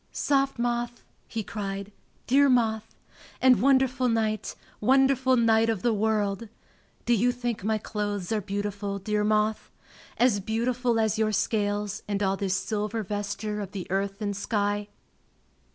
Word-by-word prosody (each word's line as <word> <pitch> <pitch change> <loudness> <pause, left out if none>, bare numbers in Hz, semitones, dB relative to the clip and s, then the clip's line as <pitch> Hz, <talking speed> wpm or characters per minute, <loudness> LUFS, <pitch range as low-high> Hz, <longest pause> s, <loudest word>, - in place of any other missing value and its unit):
"Soft 275 -2 +1
moth!" 240 0 -2 0.2
he 225 -2 -4
cried, 200 -1 -5 0.3
"dear 280 +2 +4
moth! 225 -3 +1 0.4
And 260 -1 +5
wonderful 260 -1 +3
night, 220 -2 -1 0.2
wonderful 260 +1 +3
night 225 -1 +4
of 220 -5 -1
the 235 - +3
world! 210 0 0 0.6
Do 240 - +3
you 240 +2 +3
think 240 -4 -4
my 220 +1 +1
clothes 205 -3 -3
are 215 -1 +1
beautiful, 200 0 -3
dear 210 +2 -1
moth? 215 0 +1 0.5
As 240 -4 +3
beautiful 235 +3 0
as 220 0 +1
your 215 -1 +2
scales 205 0 -1
and 205 0 -1
all 195 0 +2
this 195 -1 -1
silver 215 +2 -2
vesture 205 +1 -3
of 195 -2 -7
the 190 -3 -5
earth 195 +2 -1
and 205 -1 -2
sky?" 205 0 -1
215 Hz, 145 wpm, -27 LUFS, 205-240 Hz, 0.6 s, And